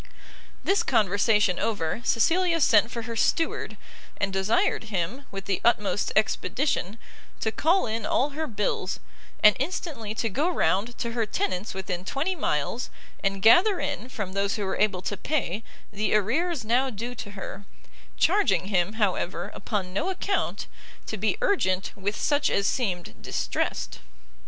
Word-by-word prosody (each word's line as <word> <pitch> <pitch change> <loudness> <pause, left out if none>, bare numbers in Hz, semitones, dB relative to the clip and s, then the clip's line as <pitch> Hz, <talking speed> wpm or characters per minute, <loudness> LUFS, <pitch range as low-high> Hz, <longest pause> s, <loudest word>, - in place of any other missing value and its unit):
This 400 +3 +3
conversation 205 - +2
over, 205 -2 -1
Cecilia 335 +9 +3
sent 225 -6 +5
for 235 -1 -5
her 230 -1 -5
Steward, 325 +8 0 0.4
and 195 -1 -1
desired 195 +3 +1
him, 210 +6 -3
with 195 0 -7
the 195 -2 -1
utmost 210 -3 +2
expedition, 215 -1 0 0.4
to 220 - 0
call 340 - +2
in 225 0 -2
all 280 +3 +1
her 315 +2 -3
bills, 205 -4 -2 0.4
and 210 -1 +8
instantly 275 - -3
to 230 - 0
go 285 - 0
round 230 - +1
to 235 - -3
her 230 -2 -1
tenants 190 +1 -2
within 185 -2 -3
twenty 300 - -1
miles, 225 - -1 0.3
and 195 -1 0
gather 360 - +6
in, 270 -4 -3
from 205 -7 -5
those 200 0 0
who 205 - -2
were 190 - -1
able 195 -4 +2
to 205 - -2
pay, 225 - -2 0.3
the 215 +1 +1
arrears 265 - +1
now 250 +4 +2
due 235 +2 -5
to 215 -4 -7
her; 195 +1 -7 0.5
charging 375 - +3
him, 190 0 +1
however, 200 -4 -1
upon 190 -3 -3
no 205 - 0
account, 385 +1 -1 0.4
to - - -4
be - - 0
urgent 195 - +1
with 205 +2 -3
such 290 -1 +2
as 200 - +1
seemed 190 -7 -1
distressed. - - -2
220 Hz, 150 wpm, -26 LUFS, 195-275 Hz, 0.5 s, and